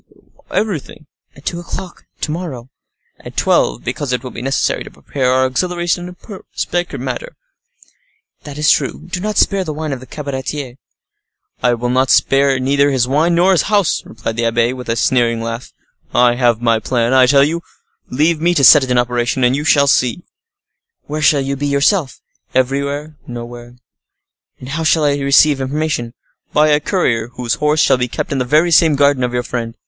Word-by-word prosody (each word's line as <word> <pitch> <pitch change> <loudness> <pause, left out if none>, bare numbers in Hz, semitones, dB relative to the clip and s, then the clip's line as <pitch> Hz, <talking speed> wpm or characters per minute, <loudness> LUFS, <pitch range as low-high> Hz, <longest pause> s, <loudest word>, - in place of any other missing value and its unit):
"Everything." 175 -7 -3 0.3
"At 140 - -17
two 170 - -3
o'clock 175 +1 -8 0.2
to 150 - -2
morrow." 140 -7 -6 0.5
"At - - -12
twelve, - - +1
because 145 -3 -4
it 125 -1 -2
will 130 - -7
be 115 - -8
necessary 135 +1 -1
to - - -11
prepare 130 -3 -3
our 130 0 +3
auxiliaries 175 +6 -1
in 175 0 -8
a 190 +2 -11 0.2
secret 175 0 -2
manner." - - -5 1.1
"That 145 -1 -9
is 150 0 +3
true; - - -1
do 180 +1 -5
not 210 +2 -3
spare 200 -2 +2
the 155 -4 -5
wine 155 -2 -3
of 135 - -5
the 130 - -13
cabaretier." 140 -2 -5 0.8
"I 120 0 +2
will 125 +2 +1
spare 135 0 +3
neither 140 +2 +2
his 130 -3 +1
wine 155 +6 +2
nor 180 +3 +4
his 185 - +3
house," 205 -4 +2
replied 110 +1 -6
the 115 - 0
abbe, 115 +1 +1
with 125 -2 -8
a 115 - +1
sneering 120 -1 +1
laugh. 115 +2 -5 0.4
"I 120 0 +4
have 120 -2 +1
my 115 -2 +2
plan, 120 +1 0
I 130 -1 +5
tell 140 +1 +5
you; 165 +4 -1 0.5
leave 155 +4 +1
me 175 +1 +2
to 140 - +2
set 145 +2 +8
it 130 - -4
in 125 - +2
operation, 120 +1 0
and 125 +1 +3
you 145 - -3
shall 145 -2 +4
see." 135 +4 +1 0.8
"Where 150 +1 -5
shall 150 -1 +4
you 135 +1 -2
be 145 +1 -3
yourself?" 140 +2 +1 0.4
"Everywhere; 140 +4 -1
nowhere." 120 0 -9 0.8
"And 130 - -10
how 160 +4 -3
shall 155 -1 +2
I 145 -1 +2
receive 140 0 +4
information?" 135 -3 -2 0.4
"By 150 +1 +4
a 150 0 +3
courier 125 - 0
whose 120 -3 -2
horse 150 +1 +2
shall 135 - +3
be 125 0 -1
kept 160 +8 -5
in 140 - -1
the 125 - -1
very 155 +7 +2
same 160 -2 +5
garden 140 -2 +2
of 125 - -1
your 120 0 -2
friend. 115 -2 -5
140 Hz, 190 wpm, -16 LUFS, 125-155 Hz, 1.1 s, set